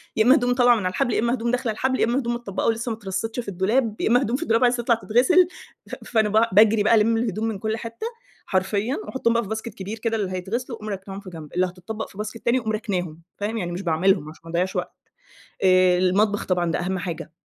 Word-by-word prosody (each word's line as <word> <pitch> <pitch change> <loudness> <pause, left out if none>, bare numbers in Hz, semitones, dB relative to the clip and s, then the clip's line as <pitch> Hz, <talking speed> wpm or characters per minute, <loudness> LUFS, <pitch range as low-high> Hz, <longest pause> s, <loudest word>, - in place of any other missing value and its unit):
يا 220 - +4
إما 255 +4 +6
هدوم 245 -2 +2
طالعة 245 -1 +5
من 210 -5 -3
الحبل، 235 +7 0
يا - - +1
إما 235 +1 +1
هدوم 235 -1 -1
داخلة 250 -2 0
الحبل، 260 +4 -1
يا - - +4
إما 240 +3 +1
هدوم 240 -3 -2
متطبقة 235 -5 -3
ولسه 230 +1 0
ما 220 - -4
اترصيتش 210 +3 -4
في 240 - -5
الدولاب، 210 +4 0
يا - - +1
إما 245 +2 +4
هدوم 240 -2 0
في 295 - -2
الدولاب 230 -5 +2
عايزة 245 -1 +2
تطلع 235 0 +3
تتغسل، 255 +12 +3 0.4
ف - - -5
فأنا 220 -3 +1
ب 220 +2 +3
باجري 215 0 +6
بقى 220 - +5
ألِمّ 225 +1 +3
الهدوم 220 -2 -1
من 220 -3 -3
كُلّ 220 +2 -2
حتة 230 - -6 0.4
حرفيًا 200 +6 0
وأحطهم 235 -3 0
بقى 235 0 +1
في 200 - -9
باسكت 220 0 -4
كبير 205 +1 -7
كده 225 0 -1
اللي 195 -3 -2
هيتغسلوا 225 +7 -4
وأقوم 215 0 -7
راكناهم 195 0 -6
في 195 - -10
جنب، 160 -4 -10
اللي 180 +1 +2
هتطبق 185 +5 -6
في - - -16
باسكت 215 +2 -6
تاني 240 +2 +3
وأقوم 220 -2 -3
راكناهم، 180 -7 -3 0.2
فاهم 210 +3 -3
يعني 175 -5 -3
مش 175 +2 -4
باعملهم 170 -2 +1
عشان 155 - -14
ما - - -10
اضيعش 180 +2 -1
وقت، - - -3 0.7
آآ، 185 -1 +5
المطبخ 200 +3 +2
طبعًا 175 -2 0
ده - - -1
أهم 190 +2 -2
حاجة، 170 -3 -5
220 Hz, 250 wpm, -23 LUFS, 190-235 Hz, 0.7 s, إما